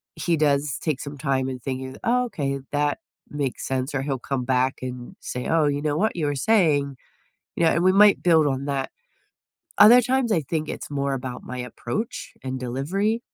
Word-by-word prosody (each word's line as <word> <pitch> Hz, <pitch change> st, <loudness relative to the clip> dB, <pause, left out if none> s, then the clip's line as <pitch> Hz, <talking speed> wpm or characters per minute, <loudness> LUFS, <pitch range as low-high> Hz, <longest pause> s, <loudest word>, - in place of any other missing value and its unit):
he 170 Hz, -2 st, 0 dB
does 145 Hz, -2 st, +1 dB
take 150 Hz, -5 st, -1 dB
some 145 Hz, 0 st, -7 dB
time 135 Hz, -2 st, 0 dB
and 130 Hz, -2 st, -6 dB
thinking, 130 Hz, 0 st, -5 dB
"Oh, 250 Hz, +2 st, +2 dB
okay, 140 Hz, -, -3 dB
that 145 Hz, +5 st, 0 dB, 0.3 s
makes 140 Hz, -3 st, -3 dB
sense," 130 Hz, +2 st, -2 dB
or 135 Hz, -, 0 dB
he'll 135 Hz, -2 st, -2 dB
come 135 Hz, -1 st, -3 dB
back 130 Hz, +1 st, +1 dB
and 125 Hz, -1 st, -7 dB
say, 125 Hz, -, -5 dB
"Oh, 160 Hz, -2 st, +3 dB
you 145 Hz, 0 st, -1 dB
know 150 Hz, 0 st, 0 dB
what 220 Hz, +4 st, +1 dB
you 165 Hz, -4 st, -1 dB
were 145 Hz, -, -1 dB
saying," 145 Hz, -6 st, +2 dB, 0.6 s
you 170 Hz, -, +2 dB
know, 165 Hz, -, +5 dB
and 170 Hz, -, +1 dB
we 185 Hz, -, +5 dB
might 205 Hz, +1 st, +6 dB
build 160 Hz, -4 st, +4 dB
on 135 Hz, 0 st, -1 dB
that. 140 Hz, -2 st, -2 dB, 0.9 s
Other 235 Hz, +4 st, +9 dB
times, 255 Hz, -2 st, +1 dB
I 165 Hz, -, +3 dB
think 155 Hz, +2 st, -3 dB
it's -, -, -6 dB
more 140 Hz, -1 st, -1 dB
about 125 Hz, -1 st, -6 dB
my 125 Hz, 0 st, -6 dB
approach 125 Hz, -, -5 dB
and 130 Hz, 0 st, -4 dB
delivery. 185 Hz, -, -1 dB
145 Hz, 200 wpm, -24 LUFS, 130-170 Hz, 0.9 s, Other